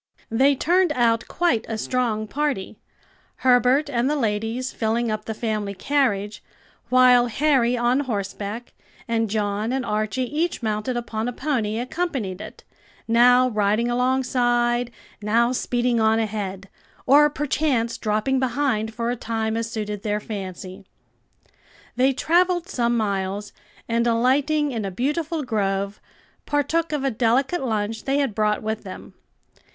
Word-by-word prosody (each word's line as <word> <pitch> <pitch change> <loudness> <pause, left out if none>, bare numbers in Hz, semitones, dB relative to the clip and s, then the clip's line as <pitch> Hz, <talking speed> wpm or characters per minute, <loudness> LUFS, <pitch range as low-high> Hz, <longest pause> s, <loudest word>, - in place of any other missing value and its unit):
They 270 +5 +4
turned 350 +5 +2
out 230 -3 +1
quite 340 -11 +1
a 225 - -2
strong 225 -2 -1
party; 245 -5 -2 0.7
Herbert 255 +4 +4
and 250 -1 0
the 300 - +1
ladies 225 +1 -1
filling 230 +1 0
up 215 - -4
the 220 - -4
family 215 -3 -2
carriage, 210 -5 0 0.5
while 250 -1 +6
Harry 250 -1 +2
on 240 +2 +2
horseback, 215 -2 -4 0.3
and 225 -2 0
John 210 +1 -1
and 260 -1 -1
Archie 215 +3 -1
each 300 +3 -2
mounted 215 +3 -1
upon 230 -1 -3
a - - -1
pony, 235 -5 -1
accompanied 245 - -3
it, - - -10 0.4
now 245 +2 +5
riding 215 +2 +1
alongside, 245 -1 +1 0.3
now 230 +3 +2
speeding 245 -1 0
on 220 0 +3
ahead, 200 -3 -3 0.4
or 295 +3 +6
perchance 285 -5 0
dropping 215 +5 0
behind 245 -4 -1
for 235 +1 -1
a - - -1
time 225 -1 -2
as 230 0 -2
suited 210 -2 -4
their 210 0 -1
fancy. 190 -2 -7 1.1
They 260 +2 +3
travelled 350 +5 +2
some 240 -9 0
miles, 200 -1 -2 0.3
and 235 +1 +1
alighting 275 +6 +2
in 225 -4 -3
a 195 - -2
beautiful 300 - -2
grove, 200 -4 -2 0.5
partook 315 +3 0
of 295 -3 -2
a 270 - +1
delicate 255 +8 +1
lunch 220 -2 -2
they 275 +1 +1
had 275 -6 0
brought 210 0 0
with 220 0 -3
them. - - -10
235 Hz, 140 wpm, -23 LUFS, 215-265 Hz, 1.1 s, while